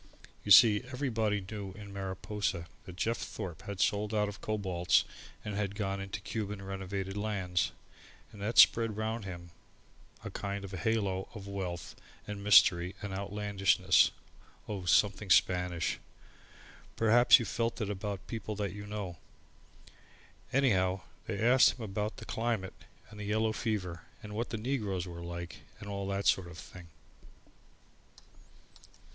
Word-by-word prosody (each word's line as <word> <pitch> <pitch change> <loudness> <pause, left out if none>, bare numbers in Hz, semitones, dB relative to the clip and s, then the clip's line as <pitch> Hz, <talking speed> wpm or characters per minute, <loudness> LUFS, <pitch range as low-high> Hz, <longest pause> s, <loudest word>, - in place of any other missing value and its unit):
You - - -6
see, 105 +2 +8
everybody 115 -6 0
knew 100 -2 -6
in 100 0 -10
Mariposa 95 -2 -3 0.2
that 90 - -9
Jeff 115 +5 -1
Thorpe 90 -1 -6
had 100 -2 -5
sold 105 +2 +1
out 105 -1 +2
of 100 - -8
Cobalts 95 -5 +1 0.4
and 105 - -3
had 100 -1 -2
gone 100 -2 -2
into 95 0 -5
Cuban 105 0 -4
Renovated 95 0 -4
Lands 100 -5 -1 0.6
and 105 - -12
that 110 +3 -2
spread 115 -2 +6
round 110 0 -2
him 85 -2 -8 0.7
a - - -6
kind 100 0 -4
of 95 - -9
halo 95 0 -1
of 100 -2 -8
wealth 95 -3 -5 0.3
and 105 -1 -6
mystery 90 -3 +5
and 100 -2 -4
outlandishness 100 0 +3 0.6
oh, 100 -4 -4
something 100 +3 +3
Spanish. 90 -1 +2 1.0
Perhaps 115 +2 +6
you've 120 -5 -3
felt 115 +3 -1
it 105 -3 -2
about 100 -1 -4
people 110 -2 -5
that 100 -3 -3
you 105 0 -8
know. 100 -5 -5 1.3
Anyhow, 95 -9 +2 0.3
they 105 - -2
asked 125 +3 +6
him 120 - -7
about 105 +2 -3
the - - -9
climate, 115 -4 -2 0.4
and 105 - -9
yellow 110 +2 0
fever 95 -7 -2 0.2
and 105 0 -8
what 115 +3 -2
the 115 - -3
negroes 105 -7 -2
were 85 -1 -8
like 85 -1 -6 0.2
and 100 - -9
all 100 -1 -4
that 100 0 -2
sort 95 -2 +3
of 85 -1 -11
thing. 90 -1 -11
100 Hz, 145 wpm, -31 LUFS, 95-110 Hz, 1.3 s, see